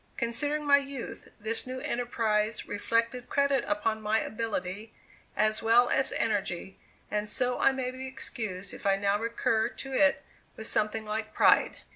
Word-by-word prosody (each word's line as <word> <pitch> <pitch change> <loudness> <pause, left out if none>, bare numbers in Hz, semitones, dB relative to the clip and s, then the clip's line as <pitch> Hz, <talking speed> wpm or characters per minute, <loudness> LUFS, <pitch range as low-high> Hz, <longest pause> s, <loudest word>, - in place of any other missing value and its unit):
Considering 290 +6 0
my 285 -1 +7
youth, 275 -3 -7
this 225 +3 +2
new 255 0 -5
enterprise 220 -3 -1
reflected 230 +4 -1
credit 280 -2 +2
upon 215 +1 0
my 215 +1 +1
ability, 220 -1 -4 0.5
as 215 +1 +2
well 235 +2 +5
as 270 0 +3
energy, 195 -4 -2 0.3
and 210 0 -1
so 250 +2 0
I - - +5
may 260 -1 -3
be 260 +1 -7
excused 210 -7 -5
if - - -5
I 195 - +4
now 200 +1 +1
recur 225 -1 0
to 270 -1 -8
it 280 +1 +3 0.3
with 220 - -7
something 220 0 0
like 215 0 -4
pride. - - +4
225 Hz, 155 wpm, -29 LUFS, 210-255 Hz, 0.5 s, my